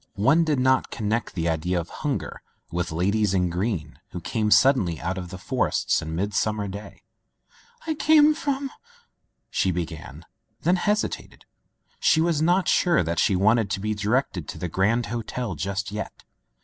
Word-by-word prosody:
One 140 +11 +4
did 155 -3 +1
not 130 0 +2
con 105 - -4
nect 115 +2 -1
the 85 -2 -2
idea 85 +2 0
of 85 - -6
hunger - - -3 0.3
with 90 0 -2
ladies 100 +4 +1
in 90 -2 +1
green 90 -5 -3
who 90 - -6
came 110 +4 -1
suddenly 105 - +4
out 90 +2 -2
of 90 -1 -7
forests 130 +7 0
on 80 0 -5
mid 100 +4 -2
summer 105 -1 0
day. 100 +1 -9 0.8
"I 320 - 0
came 310 0 +5
from 280 -3 -2 0.3
— 475 - -39
*' - - -51
she 95 - +1
began, 80 -3 -5 0.4
then 180 +3 +3
hesi 210 +4 +1
tated. - - -10 0.6
She 160 - +4
was 165 -2 +1
not 180 +3 +3
sure 170 - +3
that 85 +1 -2
she 95 - +3
wanted 110 +2 +3
to 95 - -2
be 110 +2 -1
directed 105 - -1
to - - -6
the 90 - -3
Grand 105 +8 +1
Hotel 120 0 -4
just 100 +5 -3
yet. 105 +1 -6
105 Hz, 175 wpm, -25 LUFS, 90-135 Hz, 0.8 s, came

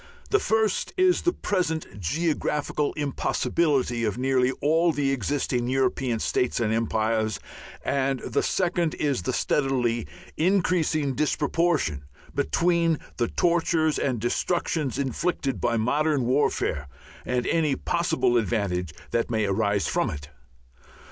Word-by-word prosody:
The 415 - +4
first 220 - 0
is 370 -1 +4
the 350 - +2
present 160 - -2
geographical 150 - -1
impossibility 140 -3 0
of 105 -1 -1
nearly 130 0 +2
all 165 +5 +2
the 140 -3 0
existing 130 -1 -1
European 130 -2 0
states 125 +3 0
and 110 -2 +1
empires; 110 -2 0 0.5
and 135 -1 0
the - - -1
second 175 -3 0
is 140 -8 0
the - - -2
steadily 125 -5 0 0.3
increasing 165 -5 +1
disproportion 150 - 0 0.3
between 170 - +2 0.2
the 120 - +1
tortures 165 -1 +1
and 125 -4 0
destructions 150 +4 -1
inflicted 140 0 -1
by 120 -1 +1
modern 145 +4 +1
warfare 125 - 0 0.4
and 125 -1 -1
any 155 -4 +1
possible 165 -8 +1
advantages 95 -7 -1
that 115 0 0
may 110 -2 +1
arise 100 -1 +1
from - - 0
it. 70 0 -7
135 Hz, 120 wpm, -25 LUFS, 115-165 Hz, 0.5 s, The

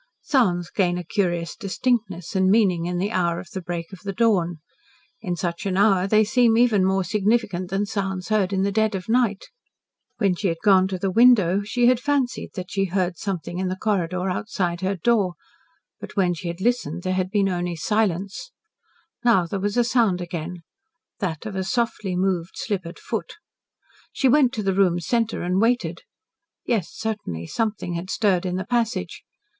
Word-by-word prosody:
Sounds 180 - +1
gain 180 -3 +1
a 180 - -4
curious 175 -2 -1
distinctness 200 -4 -2
and 190 0 +3
meaning 190 -5 +3
in 175 0 -2
the 195 +4 -1
hour 170 -4 0
of 170 - -11
the 190 - -5
break 170 +1 -5
of 190 - -9
the 200 +1 -5
dawn; 190 -6 +1 0.6
in 180 -5 -2
such 170 -1 -3
an 190 -1 -1
hour 195 -2 +4
they 215 +2 +4
seem 230 +1 +3
even 230 -5 +4
more 190 0 +2
significant 200 -3 0
than 195 +2 0
sounds 195 -3 -3
heard 205 -3 +2
in 190 -1 +1
the 200 - +1
dead 220 0 +1
of 185 -1 -5
night. 225 -4 +1 0.7
When 200 -4 +2
she 190 +3 -2
had 165 -2 -1
gone 190 -2 +5
to 190 -1 -3
the 190 +1 -1
window 205 -4 +5
she 240 +4 0
had 250 -1 +4
fancied 275 -2 -1
that 180 -2 -6
she 195 -1 +1
heard 185 -1 -1
something 180 -3 -4
in 190 - -1
the 185 - -2
corridor 185 -3 -1
outside 180 -2 -2
her 190 +1 0
door, 195 -2 +1 0.6
but - - -9
when 185 -4 +2
she 175 +1 -6
had 170 +2 -5
listened 180 -8 0
there 185 - 0
had 185 0 -1
been 200 -1 +2
only 175 -2 -2
silence. 200 - -1 0.7
Now 230 -7 +4
there 195 +4 -4
was 205 +3 -2
sound 225 -8 +2
again 175 0 -6 0.6
that 180 -3 -3
of 210 -3 -5
a 190 - -1
softly 215 -2 -1
moved 180 -2 -1
slippered 185 -5 -4
foot. - - -4 0.8
She 270 - +1
went 260 -1 +5
to 215 - -3
the 195 -1 +1
room's 175 -3 +2
centre 230 -2 0
and 180 +2 +1
waited. 225 -8 +1 0.6
Yes, 220 -8 0
certainly 205 - -4
something 215 - -2
had 170 +2 -5
stirred 190 -4 +1
in 180 - -2
the 185 +1 -3
passage. 235 0 -1
190 Hz, 185 wpm, -23 LUFS, 180-220 Hz, 0.8 s, gone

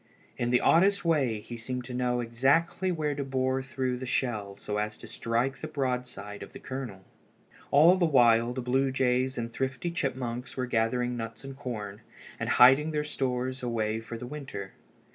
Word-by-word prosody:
In 120 - -1
the 125 0 +3
oddest 195 +3 +4
way 135 -10 +2
he 120 - -8
seemed 125 +2 -4
to 125 - -7
know 125 0 0
exactly 140 +10 +2
where 155 -4 -1
to 140 0 -3
bore 130 0 0
through 130 -1 -2
the 130 - -5
shell 105 -6 -1
so 105 0 -3
as 105 0 -2
to - - -11
strike 120 +4 -1
the 155 - -5
broad 130 -5 -1
side 105 -2 -9
of - - -9
the - - -9
kernel. 130 -8 -6 0.7
All 160 +6 +7
the 180 - +3
while 120 -4 +5
the 125 0 -4
blue 130 +2 +1
jays 130 0 +1
and 115 -1 -2
the - - -22
thrifty 135 +7 -2
chipmunks 125 -6 -3
were 130 - 0
gathering 120 +1 0
nuts 115 +2 -6
and 135 0 -8
corn, 110 -7 -6 0.4
and - - -2
hiding 135 +5 +6
their 150 -1 -1
stores 130 -2 -2
away 110 -3 -1
for 115 +1 -7
the 125 - -7
winter. 125 -8 -7
125 Hz, 190 wpm, -29 LUFS, 115-135 Hz, 0.7 s, All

